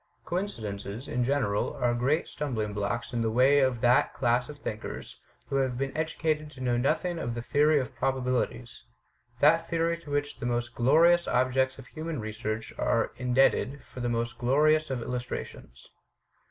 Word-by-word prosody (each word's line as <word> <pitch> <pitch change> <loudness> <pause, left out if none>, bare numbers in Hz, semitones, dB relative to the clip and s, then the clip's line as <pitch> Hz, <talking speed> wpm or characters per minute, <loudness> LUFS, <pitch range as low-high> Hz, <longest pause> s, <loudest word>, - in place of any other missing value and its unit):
Coincidences, 110 - -4
in 125 - 0
general, 125 -6 0
are 120 -2 +1
great 135 +7 +1
stumbling 115 -8 -3
blocks 105 +4 -3
in 120 - 0
the 115 - +1
way 130 +5 +5
of 130 -4 +1
that 125 0 +3
class 120 0 +1
of 150 - -8
thinkers 110 -6 -6 0.2
who 140 - -2
have 130 -2 0
been 135 0 -3
educated 155 -1 -1
to 130 - -14
know 125 -2 0
nothing 160 +7 0
of 120 -6 -3
the 120 - -3
theory 150 +4 +3
of 130 - -4
probabilities: 125 -3 -2 0.6
that 165 +3 +4
theory 165 0 +1
to 160 - -13
which 145 0 -2
the - - -4
most 120 0 -2
glorious 165 +8 +4
objects 130 +1 +1
of 135 - -11
human 160 +1 -5
research 110 0 -4
are - - +1
in 125 -1 -2
debted 135 0 +3
for 130 - -11
the 120 -1 -1
most 115 0 -2
glorious 155 +5 +3
of 130 -3 -2
illustrations." 120 - -6
130 Hz, 170 wpm, -28 LUFS, 120-150 Hz, 0.6 s, way